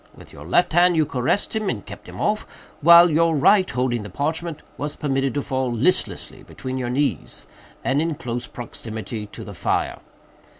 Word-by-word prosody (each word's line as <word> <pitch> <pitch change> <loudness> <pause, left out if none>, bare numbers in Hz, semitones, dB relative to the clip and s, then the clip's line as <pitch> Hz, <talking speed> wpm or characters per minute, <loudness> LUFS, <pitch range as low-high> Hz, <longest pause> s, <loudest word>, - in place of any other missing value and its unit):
With - - -15
your 75 +2 -11
left 165 - +2
hand 175 +1 +5
you 155 - +4
caressed 135 - -1
him 215 -2 -1
and - - -4
kept - - -11
him - - -10
off, 210 0 0 0.3
while 170 +2 +8
your 165 +1 +3
right, 185 +6 +4
holding 125 -2 -1
the 105 - -8
parchment, 155 - -3
was 145 +1 -4
permitted 135 -3 -1
to 145 - -1
fall 130 -1 -1
listlessly 125 +10 -1
between 130 0 -6
your 125 -1 -2
knees, 130 - -2 0.4
and 135 +2 +1
in 165 -1 -1
close 120 -5 -5
proximity 110 -3 -6
to - - -10
the - - -9
fire. - - -1
140 Hz, 180 wpm, -22 LUFS, 120-165 Hz, 0.4 s, while